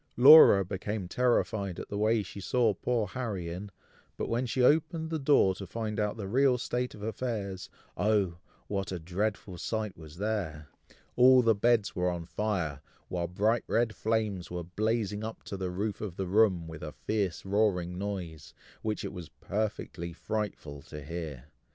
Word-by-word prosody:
Laura 130 Hz, -7 st, +9 dB
became 100 Hz, +1 st, -4 dB
terrified 110 Hz, -5 st, 0 dB
at -, -, -7 dB
the 100 Hz, -, -3 dB
way 110 Hz, 0 st, +2 dB
she 100 Hz, +1 st, -9 dB
saw 115 Hz, +2 st, +2 dB
poor 115 Hz, +3 st, 0 dB
Harry 100 Hz, -5 st, -4 dB
in, 95 Hz, +4 st, -6 dB, 0.5 s
but -, -, -2 dB
when 120 Hz, +2 st, 0 dB
she 125 Hz, +2 st, 0 dB
opened 160 Hz, +3 st, +2 dB
the 160 Hz, -, -1 dB
door 135 Hz, -9 st, +4 dB
to 95 Hz, +1 st, -8 dB
find 110 Hz, +1 st, -3 dB
out 105 Hz, +1 st, -1 dB
the 100 Hz, -3 st, -5 dB
real 130 Hz, +4 st, +3 dB
state 125 Hz, +1 st, -2 dB
of 105 Hz, -, -10 dB
affairs, 105 Hz, -5 st, -3 dB, 0.3 s
oh! 100 Hz, -3 st, +1 dB, 0.3 s
what 100 Hz, 0 st, -3 dB
a 90 Hz, -, -2 dB
dreadful 90 Hz, +2 st, -3 dB
sight 110 Hz, -3 st, -3 dB
was 80 Hz, -1 st, -12 dB
there! 90 Hz, -8 st, -3 dB, 0.5 s
all 125 Hz, 0 st, +7 dB
the 115 Hz, -1 st, +5 dB
beds 110 Hz, 0 st, +2 dB
were 90 Hz, 0 st, +1 dB
on 85 Hz, -2 st, -4 dB
fire, 85 Hz, -8 st, -2 dB, 0.3 s
while 85 Hz, -1 st, -2 dB
bright 105 Hz, +6 st, +1 dB
red 115 Hz, -1 st, +1 dB
flames 110 Hz, -5 st, -1 dB
were 90 Hz, 0 st, -4 dB
blazing 105 Hz, +3 st, -1 dB
up 110 Hz, 0 st, -6 dB
to -, -, -6 dB
the 95 Hz, -1 st, -3 dB
roof 100 Hz, +3 st, -3 dB
of 100 Hz, -5 st, -5 dB
the 95 Hz, -, -2 dB
room, 95 Hz, -3 st, +3 dB
with 80 Hz, -1 st, -8 dB
a 75 Hz, -1 st, -6 dB
fierce 100 Hz, -6 st, -2 dB
roaring 95 Hz, -3 st, +1 dB
noise, 90 Hz, -7 st, -5 dB, 0.3 s
which 110 Hz, -1 st, -2 dB
it -, -, -5 dB
was 90 Hz, -4 st, -8 dB
perfectly 100 Hz, -4 st, -4 dB
frightful 85 Hz, -6 st, -4 dB
to 75 Hz, +1 st, -9 dB
hear. 75 Hz, -4 st, -6 dB
100 Hz, 175 wpm, -30 LUFS, 90-110 Hz, 0.5 s, Laura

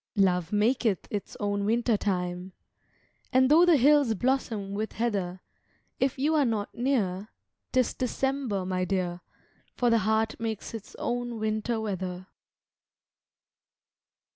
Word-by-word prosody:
Love 180 Hz, -3 st, +2 dB
maketh 215 Hz, -1 st, +1 dB
its 205 Hz, -2 st, -5 dB
own 205 Hz, -1 st, -1 dB
winter 230 Hz, +2 st, +2 dB
time, 180 Hz, -2 st, -2 dB, 0.8 s
And 260 Hz, 0 st, +4 dB
though 340 Hz, +3 st, +7 dB
the 335 Hz, -3 st, +6 dB
hills 280 Hz, -3 st, +4 dB
blossom 225 Hz, -4 st, -1 dB
with 215 Hz, +2 st, -3 dB
heather, 195 Hz, -6 st, -2 dB, 0.6 s
If 270 Hz, +1 st, +1 dB
you 295 Hz, +4 st, +1 dB
are 305 Hz, -2 st, +4 dB
not 220 Hz, -5 st, -1 dB
near, 215 Hz, -6 st, -1 dB, 0.4 s
'tis 255 Hz, -2 st, +2 dB
December, 255 Hz, -5 st, -1 dB
my 185 Hz, 0 st, -1 dB
dear, 180 Hz, -2 st, -2 dB, 0.5 s
For 245 Hz, -1 st, +2 dB
the 230 Hz, -, +4 dB
heart 220 Hz, +2 st, 0 dB
makes 225 Hz, -2 st, -4 dB
its 225 Hz, -3 st, -8 dB
own 240 Hz, -1 st, -2 dB
winter 215 Hz, +2 st, -1 dB
weather. 185 Hz, -4 st, -4 dB
220 Hz, 125 wpm, -28 LUFS, 195-245 Hz, 0.8 s, though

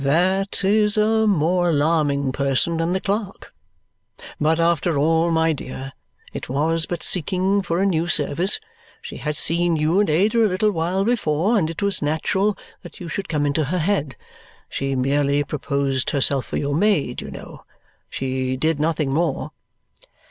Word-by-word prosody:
"That 185 Hz, +8 st, +1 dB
is 210 Hz, +1 st, +2 dB
a 220 Hz, +1 st, +3 dB
more 175 Hz, -1 st, +2 dB
alarming 145 Hz, -3 st, +1 dB
person 140 Hz, +4 st, +1 dB
than 165 Hz, +1 st, 0 dB
the 190 Hz, -, 0 dB
clerk. 200 Hz, 0 st, -4 dB, 0.9 s
But 160 Hz, +2 st, +2 dB
after 170 Hz, -1 st, +1 dB
all, 165 Hz, +3 st, +2 dB
my 160 Hz, -1 st, +2 dB
dear, 135 Hz, -1 st, -7 dB, 0.4 s
it -, -, -6 dB
was 160 Hz, +4 st, +1 dB
but 175 Hz, -2 st, -4 dB
seeking 190 Hz, +3 st, +1 dB
for 170 Hz, -2 st, -2 dB
a 195 Hz, -, +2 dB
new 170 Hz, -3 st, +1 dB
service. 175 Hz, +3 st, +1 dB, 0.4 s
She -, -, -8 dB
had 150 Hz, -1 st, -3 dB
seen 170 Hz, +1 st, +2 dB
you 155 Hz, +5 st, +1 dB
and 205 Hz, -, +2 dB
Ada 210 Hz, +9 st, +3 dB
a -, -, +4 dB
little 205 Hz, +3 st, +1 dB
while 180 Hz, +2 st, -1 dB
before, 205 Hz, -3 st, +1 dB
and 170 Hz, -7 st, +1 dB
it 165 Hz, +4 st, -5 dB
was 200 Hz, -1 st, 0 dB
natural 190 Hz, +7 st, 0 dB, 0.2 s
that -, -, -12 dB
you 175 Hz, -3 st, -7 dB
should 200 Hz, -, -4 dB
come 150 Hz, -3 st, 0 dB
into 145 Hz, +1 st, 0 dB
her 175 Hz, +7 st, -2 dB
head. 160 Hz, -5 st, -1 dB, 0.5 s
She 135 Hz, 0 st, -2 dB
merely 140 Hz, +2 st, +1 dB
proposed 140 Hz, -2 st, -2 dB
herself 140 Hz, -1 st, +1 dB
for -, -, -4 dB
your 145 Hz, 0 st, -1 dB
maid, 165 Hz, -7 st, +1 dB
you -, -, -8 dB
know. -, -, -10 dB, 0.5 s
She 130 Hz, 0 st, -2 dB
did 155 Hz, +2 st, 0 dB
nothing 155 Hz, -2 st, 0 dB
more." 160 Hz, 0 st, -1 dB
165 Hz, 165 wpm, -21 LUFS, 145-190 Hz, 0.9 s, a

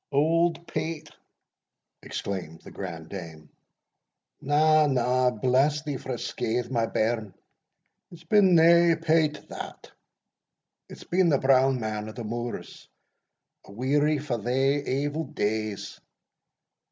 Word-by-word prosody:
"Auld 165 Hz, +3 st, +2 dB
Peght!" 160 Hz, -1 st, -5 dB, 0.9 s
exclaimed 90 Hz, -5 st, -6 dB
the -, -, -12 dB
grand 80 Hz, -1 st, -7 dB
dame; 80 Hz, -6 st, -9 dB, 0.9 s
"na, 155 Hz, +1 st, +4 dB
na 125 Hz, -1 st, +2 dB
bless 130 Hz, +6 st, +1 dB
thee 145 Hz, -3 st, -3 dB
frae 125 Hz, -1 st, -5 dB
scathe, 120 Hz, +1 st, -3 dB
my 115 Hz, -3 st, +1 dB
bairn, 110 Hz, -3 st, -1 dB, 0.7 s
it's 170 Hz, -1 st, -14 dB
been 190 Hz, +1 st, +4 dB
nae 170 Hz, +1 st, +6 dB
Peght 160 Hz, -2 st, 0 dB
that -, -, -9 dB, 1.0 s
it's -, -, -11 dB
been 180 Hz, 0 st, +2 dB
the 140 Hz, -, +3 dB
Brown 135 Hz, -1 st, +3 dB
Man 110 Hz, -1 st, -4 dB
of 110 Hz, -, -11 dB
the 120 Hz, -, -6 dB
Moors! 120 Hz, +2 st, -6 dB, 0.8 s
O 100 Hz, -, -13 dB
weary 145 Hz, +6 st, +1 dB
fa' 135 Hz, -5 st, -3 dB
thae 135 Hz, +5 st, +1 dB
evil 145 Hz, +4 st, -2 dB
days! 110 Hz, -4 st, -3 dB
135 Hz, 115 wpm, -26 LUFS, 115-155 Hz, 1.0 s, nae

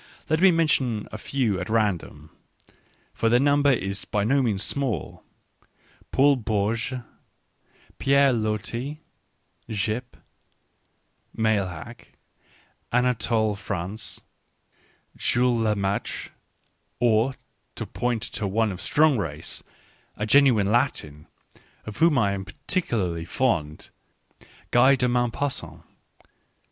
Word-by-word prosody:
Let 155 Hz, +1 st, +2 dB
me 190 Hz, -, +8 dB
mention 140 Hz, -, +1 dB
a 110 Hz, -, -7 dB
few 115 Hz, -6 st, -1 dB
at 90 Hz, -, -5 dB
random 95 Hz, -8 st, -1 dB, 0.4 s
— -, -, -36 dB
for 115 Hz, -, +1 dB
their 120 Hz, +2 st, +4 dB
number 145 Hz, +1 st, +4 dB
is 100 Hz, -5 st, -1 dB
by 105 Hz, -, -1 dB
no 135 Hz, +6 st, +3 dB
means 105 Hz, -6 st, 0 dB
small 130 Hz, -, -2 dB, 0.4 s
— -, -, -33 dB
Paul 140 Hz, +1 st, +4 dB
Bourget, 115 Hz, +3 st, -1 dB, 1.0 s
Pierre 140 Hz, -1 st, +4 dB
Loti,V 120 Hz, +6 st, -3 dB, 0.7 s
Gyp, 110 Hz, +5 st, -3 dB, 1.2 s
Meilhac, 110 Hz, +1 st, -2 dB, 0.8 s
Anatole 115 Hz, -3 st, +1 dB
France, 100 Hz, +1 st, -5 dB, 1.0 s
Jules 120 Hz, -1 st, +1 dB
Lemaitre; 100 Hz, -2 st, -1 dB, 0.7 s
or, 120 Hz, +2 st, +2 dB, 0.4 s
to -, -, -4 dB
point 120 Hz, -2 st, -2 dB
to 110 Hz, -3 st, -3 dB
one 110 Hz, +2 st, +1 dB
of 95 Hz, 0 st, -7 dB
strong 150 Hz, -1 st, +3 dB
race, 80 Hz, -4 st, -4 dB, 0.5 s
a 105 Hz, -, -3 dB
genuine 110 Hz, -5 st, +4 dB
Latin, 80 Hz, -, -1 dB, 0.6 s
of 110 Hz, -, -8 dB
whom 165 Hz, -2 st, +4 dB
I 100 Hz, -5 st, +3 dB
am 100 Hz, -1 st, -3 dB
particularly 110 Hz, -, -2 dB
fond, 85 Hz, -, -1 dB, 0.8 s
Guy 130 Hz, +3 st, +6 dB
de 125 Hz, -1 st, +1 dB
Maupassant. 120 Hz, -, -2 dB
115 Hz, 105 wpm, -25 LUFS, 100-130 Hz, 1.2 s, me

